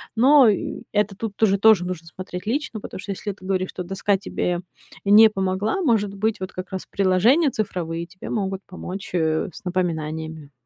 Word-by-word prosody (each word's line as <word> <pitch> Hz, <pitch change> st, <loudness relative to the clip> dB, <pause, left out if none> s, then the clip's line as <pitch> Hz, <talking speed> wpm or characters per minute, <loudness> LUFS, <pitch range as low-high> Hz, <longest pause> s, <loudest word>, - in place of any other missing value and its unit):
но 260 Hz, +2 st, +7 dB
и 205 Hz, -, -1 dB
это 210 Hz, -1 st, +1 dB
тут 205 Hz, 0 st, -5 dB
тоже 200 Hz, -3 st, +3 dB
тоже 200 Hz, -3 st, +5 dB
нужно 175 Hz, -2 st, -5 dB
смотреть 180 Hz, +2 st, -7 dB
лично. 235 Hz, -2 st, -2 dB
Потому 185 Hz, -, -8 dB
что 200 Hz, -, -5 dB
если 205 Hz, +2 st, -4 dB
ты 190 Hz, -1 st, -14 dB
говоришь, 185 Hz, -1 st, -1 dB
что 180 Hz, -, -5 dB
доска 195 Hz, +2 st, 0 dB
тебе 180 Hz, -2 st, -2 dB, 0.5 s
не 210 Hz, +2 st, +8 dB
помогла, 195 Hz, -, -1 dB
может 220 Hz, -, +1 dB
быть 215 Hz, +2 st, -1 dB
вот 185 Hz, 0 st, -5 dB
как 185 Hz, +1 st, -7 dB
раз 190 Hz, -, -4 dB
приложения 210 Hz, -, +3 dB
цифровые 170 Hz, -7 st, -3 dB
тебе 185 Hz, +2 st, -10 dB
могут 195 Hz, -3 st, -2 dB
помочь, 185 Hz, +1 st, -7 dB
э, 160 Hz, +2 st, +1 dB
с -, -, -12 dB
напоминаниями. 160 Hz, -4 st, -3 dB
190 Hz, 180 wpm, -23 LUFS, 180-215 Hz, 0.5 s, не